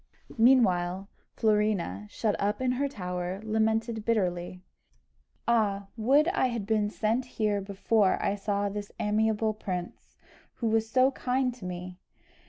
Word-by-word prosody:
Meanwhile 195 Hz, -6 st, +3 dB, 0.3 s
Florina, 210 Hz, -, +1 dB
shut 215 Hz, -, -1 dB
up 205 Hz, +2 st, 0 dB
in 255 Hz, -1 st, +1 dB
her 270 Hz, +3 st, 0 dB
tower, 180 Hz, -5 st, -4 dB
lamented 220 Hz, +1 st, 0 dB
bitterly. 180 Hz, -5 st, -1 dB, 0.8 s
"Ah, 205 Hz, -4 st, +1 dB
would 270 Hz, +7 st, +3 dB
I 355 Hz, -8 st, +2 dB
had 235 Hz, -5 st, -3 dB
been 210 Hz, -1 st, +1 dB
sent 220 Hz, +4 st, 0 dB
here 210 Hz, -2 st, +1 dB
before 200 Hz, +1 st, +1 dB
I -, -, 0 dB
saw 205 Hz, 0 st, -1 dB
this 205 Hz, 0 st, -5 dB
amiable 215 Hz, +1 st, +1 dB
prince, 180 Hz, -4 st, -6 dB, 0.4 s
who 235 Hz, -, -4 dB
was 220 Hz, 0 st, +1 dB
so 260 Hz, +2 st, +4 dB
kind 255 Hz, -1 st, 0 dB
to 235 Hz, -6 st, -11 dB
me! 180 Hz, 0 st, -6 dB
210 Hz, 135 wpm, -28 LUFS, 195-230 Hz, 0.8 s, so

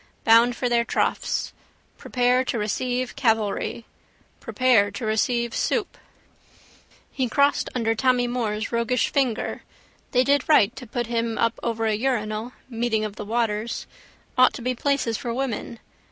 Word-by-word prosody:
Bound 230 Hz, +2 st, +5 dB
for 250 Hz, -, -1 dB
their 240 Hz, -1 st, +2 dB
troughs. -, -, -1 dB, 0.5 s
Prepare 250 Hz, 0 st, +2 dB
to 245 Hz, -, -2 dB
receive 245 Hz, +4 st, -2 dB
cavalry. 225 Hz, -2 st, 0 dB, 0.5 s
Prepare 245 Hz, -6 st, +3 dB
to 205 Hz, +3 st, -6 dB
receive 235 Hz, +2 st, 0 dB
soup. 425 Hz, -5 st, -1 dB, 1.2 s
He 255 Hz, -3 st, -1 dB
crossed 280 Hz, +3 st, +2 dB
under 225 Hz, -2 st, +1 dB
Tommy 250 Hz, +1 st, +2 dB
Moore's 225 Hz, -3 st, -2 dB
roguish 235 Hz, +1 st, +1 dB
finger. 260 Hz, -6 st, -1 dB, 0.5 s
They 250 Hz, 0 st, +3 dB
did 285 Hz, +2 st, +1 dB
right 235 Hz, -6 st, +5 dB
to 250 Hz, -, -9 dB
put 240 Hz, +2 st, -2 dB
him 230 Hz, -1 st, -2 dB
up 230 Hz, 0 st, 0 dB
over 225 Hz, -1 st, -2 dB
a 220 Hz, -, +2 dB
urinal: 220 Hz, 0 st, -2 dB
meeting 230 Hz, -3 st, -1 dB
of 210 Hz, -1 st, -6 dB
the 210 Hz, -, -7 dB
waters. 225 Hz, 0 st, -1 dB, 0.5 s
Ought 255 Hz, -, +6 dB
to 240 Hz, -, -7 dB
be 255 Hz, +1 st, 0 dB
places 250 Hz, -3 st, 0 dB
for 240 Hz, -, -4 dB
women. 245 Hz, -2 st, -3 dB
235 Hz, 145 wpm, -24 LUFS, 225-255 Hz, 1.2 s, Ought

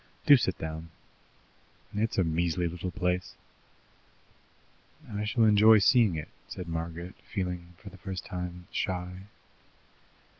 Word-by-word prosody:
Do 145 Hz, -, +9 dB
sit 95 Hz, -8 st, 0 dB
down! 80 Hz, +1 st, -6 dB, 1.0 s
It's 110 Hz, +2 st, -1 dB
a 95 Hz, -, +4 dB
measly 85 Hz, +1 st, 0 dB
little 90 Hz, +2 st, -4 dB
place." 90 Hz, -1 st, -1 dB, 1.8 s
"I 105 Hz, +1 st, -2 dB
shall 115 Hz, +2 st, +2 dB
enjoy 110 Hz, +1 st, +7 dB
seeing 105 Hz, -2 st, +5 dB
it," 75 Hz, -2 st, -5 dB, 0.2 s
said 90 Hz, -, -7 dB
Margaret, 85 Hz, +2 st, -4 dB, 0.2 s
feeling, 90 Hz, -3 st, -4 dB
for 100 Hz, +1 st, -11 dB
the 95 Hz, -, -13 dB
first 95 Hz, -2 st, -5 dB
time, 90 Hz, -1 st, -6 dB
shy. 90 Hz, +1 st, -3 dB
90 Hz, 120 wpm, -29 LUFS, 85-100 Hz, 1.8 s, Do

